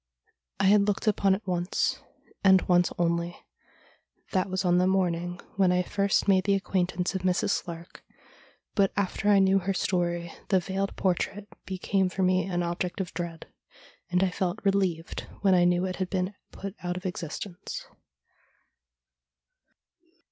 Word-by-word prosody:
I - - +1
had 200 +1 +5
looked 205 +2 0
upon 200 -2 +3
it 205 - -9
once, 180 0 0 0.4
and 190 -1 +6
once 175 -1 +3
only. 170 0 0 0.9
That 190 -1 +1
was 185 +1 -1
on 175 0 +4
the 180 - +3
morning 175 -2 0 0.2
when 190 -2 +4
I 180 0 +2
first 200 +3 +1
made 190 -2 +4
the 200 -1 +3
ac 195 - -1
quaintance 180 -2 -1
of 190 - -2
Mrs. 185 +1 +1
Slark, 170 0 -9 0.8
but 195 -2 +3
after 200 +1 0
I 205 - +6
knew 195 0 +4
her 195 +1 -2
story 175 -2 -1
the 190 - +3
veiled 195 +2 -3
portrait 195 +2 -1 0.2
became 190 0 0
for 190 +1 -2
me 185 -1 +3
an 175 -2 -1
object 175 +2 -3
of 185 -3 -3
dread, 170 -1 -5 0.6
and 180 +1 +2
I 190 - +1
felt 185 +3 -2
relieved 190 -4 0
when 195 -2 +4
I 175 -1 +5
knew 175 +1 +2
it 185 -1 -3
had 185 -2 -2
been 185 +1 -1 0.2
put 195 -1 -7
out 175 0 -2
of 185 - -8
existence. 180 - -5
185 Hz, 160 wpm, -27 LUFS, 175-195 Hz, 0.9 s, and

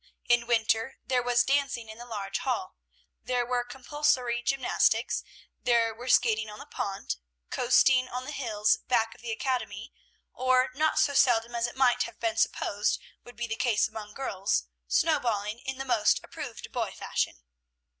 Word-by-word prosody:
In 240 -1 +3
winter 225 +1 +1
there 255 -1 +1
was 245 0 +3
dancing 275 -4 0
in 220 +1 -10
the 240 - -9
large 205 -4 -3
hall, 320 +9 -2 0.5
there 245 -1 0
were 245 0 0
compulsory 250 -1 0
gymnastics, 265 +1 +1 0.4
there 230 -2 +3
were 240 +3 -9
skating 220 -4 +3
on 210 - -9
the - - -10
pond, 195 - -4 0.3
coasting 255 +1 +4
on 250 +1 -5
the 295 - -5
hills 215 -7 +1
back 225 -2 +2
of - - -19
the 235 -1 -4
academy, 230 -2 -3 0.4
or, 255 0 +2
not 310 +4 +1
so 285 - +3
seldom 240 -3 +3
as 235 0 0
it 240 - -9
might 245 -2 +4
have - - -11
been 225 -1 -1
supposed 205 -2 +1 0.2
would 245 - -13
be 240 +2 -3
the 220 -1 -3
case 230 -3 +2
among 215 -1 -9
girls, 205 -6 -1 0.2
snowballing 225 -8 +1
in 265 0 -3
the 270 - -4
most 235 -5 +3
approved - - -8
boy - - -1
fashion. 60 - -3
240 Hz, 165 wpm, -28 LUFS, 220-255 Hz, 0.5 s, coasting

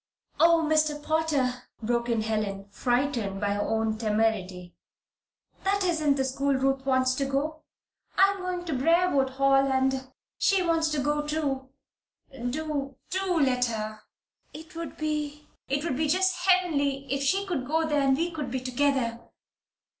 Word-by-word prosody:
"Oh, 335 -1 +5
Mr. 310 -1 +2
Potter!" 295 -6 0 0.2
broke 235 +1 0
in 230 -2 +1
Helen, 215 -3 -2
frightened 240 -4 0
by 205 0 0
her 205 - -1
own 220 0 -1
temerity. 210 -5 -1 0.9
"That 395 +1 +1
isn't 315 -6 +2
the 265 -1 0
school 275 +1 0
Ruth 270 0 +1
wants 260 -1 +3
to 275 +1 -1
go 295 +3 -2 0.6
to. - - -1
I 390 +1 +7
am 395 - -6
going 365 -1 -4
to 325 - -2
Briarwood 295 0 +3
Hall, 275 0 +3
and 265 0 0 0.3
she 390 -2 +3
wants 330 -2 +2
to 300 - 0
go, 295 +1 +1
too. 280 -4 -2 0.6
Do, 275 +2 -3 0.2
do 375 -2 0
let 250 -3 +3
her. 215 -2 -4 0.5
It 320 +3 -11
would 335 0 -6
be 300 -1 -3 0.2
it 280 +2 0
would 285 -6 -1
be 310 +1 +1
just 370 +2 +1
heavenly, 285 -7 +2
if 275 - -1
she 385 +8 +1
could 310 -10 -3
go 320 +2 +1
there, 295 -2 +1
and 270 -1 +3
we 340 +2 -1
could 300 -5 -4
be 260 +1 -2
together!" 255 -2 0
275 Hz, 160 wpm, -27 LUFS, 250-315 Hz, 0.9 s, I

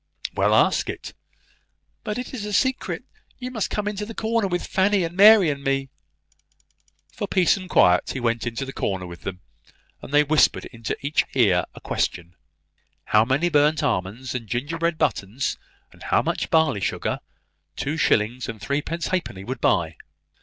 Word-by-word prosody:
"Well, - - +2
ask - - +3
it." - - -6 0.9
"But 210 -1 -3
it 250 +1 -6
is 235 -5 -5
a 210 0 -4
secret. 260 +5 0 0.3
You 250 0 -6
must 220 -5 -2
come 210 -1 -2
into 210 0 -3
the 225 +1 -7
corner 225 -2 0
with 175 -1 -2
Fanny, 195 0 +2
and 165 +1 -4
Mary, 205 -1 +8
and 140 -1 -6
me." 135 -1 0 1.2
For - - -4
peace 185 -3 +3
and 185 -2 -8
quiet 90 - +4
he 135 - -3
went 115 -1 -1
into 120 +4 -3
the 135 - -8
corner 95 -2 -2
with 85 -1 -10
them, 90 -1 -6 0.6
and - - -10
they 145 +1 +5
whispered 150 0 +3
into 115 -2 -5
each 150 +2 +2
ear 95 -9 +3
a - - -10
question, 85 -1 -2 0.8
how 105 0 +5
many 135 +7 +1
burnt 150 -1 +3
almonds 105 +8 -2
and 120 -3 -5
gingerbread 160 +8 -1
buttons, 110 +3 -1 0.3
and - - -20
how - - +1
much - - -2
barley 160 -11 +2
sugar, 95 - -2 0.6
two 145 +3 -2
shillings 120 -5 +1
and 110 -1 -6
threepence 150 - -2
halfpenny 170 - -3
would 125 +3 -5
buy? 80 -2 +1
140 Hz, 170 wpm, -23 LUFS, 115-185 Hz, 1.2 s, Mary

